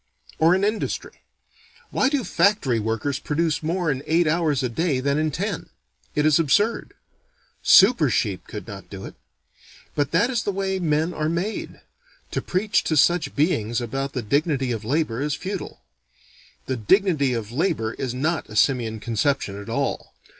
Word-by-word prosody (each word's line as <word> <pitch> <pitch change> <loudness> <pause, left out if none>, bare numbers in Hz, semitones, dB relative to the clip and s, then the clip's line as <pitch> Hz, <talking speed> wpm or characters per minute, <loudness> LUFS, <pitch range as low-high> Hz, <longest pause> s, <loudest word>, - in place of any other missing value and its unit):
Or 165 +3 +5
in 190 - 0
industry: 210 +1 -2 0.7
Why 265 - +2
do 280 -3 0
factory 195 - +2
workers 115 +5 -2
produce 160 +1 -1
more 165 +1 0
in 135 -1 -3
eight 170 +2 +3
hours 155 -4 +1
a - - +1
day 145 +2 0
than 140 +2 0
in 155 0 +1
ten? 180 +5 -4 0.5
It 150 -1 +2
is 155 0 +5
absurd. 205 +9 +1 0.7
Super 190 - +6
sheep 100 -4 -1
could 105 - -8
not 100 -3 -9
do 95 -1 -8
it. - - -9 0.8
But 145 -2 0
that 205 +10 +2
is 240 -2 0
the 205 - -1
way 190 0 -2
men 160 0 0
are 155 -1 -1
made. 175 +6 -3 0.5
To - - -1
preach 200 +3 0
to 155 - +1
such 155 -1 +3
beings 120 - +1
about 135 +4 -3
the 125 - -3
dignity 140 +2 0
of 115 -2 -3
labor 130 -1 -1
is 145 0 -1
futile. 190 +6 -6 0.8
The 130 - -2
dignity 145 - +2
of 115 -2 -4
labor 120 -6 0
is 125 -2 -4
not 160 +5 -1
a 105 - -9
simian 115 -1 +2
conception 115 -2 -1
at 100 - -10
all. - - -2
150 Hz, 170 wpm, -23 LUFS, 125-175 Hz, 0.8 s, Super